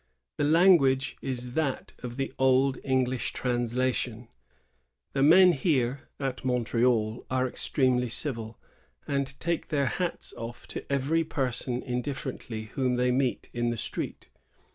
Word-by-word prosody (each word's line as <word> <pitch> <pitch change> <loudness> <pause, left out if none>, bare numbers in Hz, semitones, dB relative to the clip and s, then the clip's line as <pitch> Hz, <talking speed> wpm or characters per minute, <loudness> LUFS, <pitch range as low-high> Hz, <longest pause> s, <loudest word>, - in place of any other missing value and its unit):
The - - 0
language 150 -5 +4
is 125 -2 -4
that 145 -3 -1
of 125 0 -7
the 135 - -2
old 130 +1 +3
English 130 -2 0
translation: 120 -1 -1 0.8
"The 135 - 0
men 180 +6 +8
here 135 -5 0
[at 135 -2 -3
Montreal] 120 -3 +1
are 130 0 +1
extremely 125 -1 +1
civil, 115 -4 -1 0.5
and 140 0 -2
take 170 -1 -1
their 145 -3 +1
hats 175 +7 -3
off 115 +1 -7
to - - -7
every 140 +4 +1
person 125 -4 -2
indifferently 125 -3 -4
whom 130 -3 +1
they 125 0 +2
meet 130 0 -1
in 120 0 0
the 120 - -2
streets. - - -4
130 Hz, 130 wpm, -28 LUFS, 120-140 Hz, 0.8 s, men